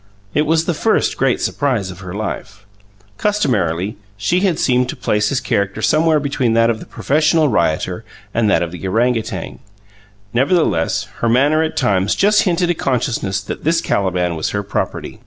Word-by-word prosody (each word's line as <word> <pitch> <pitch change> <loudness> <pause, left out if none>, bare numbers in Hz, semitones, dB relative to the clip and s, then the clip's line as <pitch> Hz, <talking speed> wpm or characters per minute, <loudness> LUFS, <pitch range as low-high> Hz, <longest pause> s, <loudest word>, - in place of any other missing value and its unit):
It 150 0 +1
was 160 +1 +2
the 175 - 0
first 220 +8 +1
great 135 -2 +1
surprise 125 -10 -1
of 90 - -11
her 90 -2 -8
life. 105 -1 -5 0.5
Customarily, 105 - 0 0.2
she 170 - +1
had 185 -4 +1
seemed 125 -1 +1
to - - -3
place 105 0 0
his 135 - 0
character 105 -5 -1
somewhere 155 0 +3
between 140 -5 0
that 115 0 +4
of 110 - -4
the - - -11
professional 155 +1 +2
rioter 85 -7 0 0.3
and 115 -2 +2
that 85 - +3
of 85 - -4
the 90 - -9
orang 120 +6 +2
outang; 110 -6 -5 0.7
nevertheless, 130 - +1
her 115 - 0
manner 145 +6 +3
at 160 0 -2
times 95 -1 +1
just 210 +1 +4
hinted 175 0 +1
a - - +2
consciousness 120 - -1
that 100 - -7
this 165 +2 +2
Caliban 90 - 0
was 80 - -2
her 100 0 -2
property. 100 - -4
120 Hz, 175 wpm, -18 LUFS, 100-155 Hz, 0.7 s, that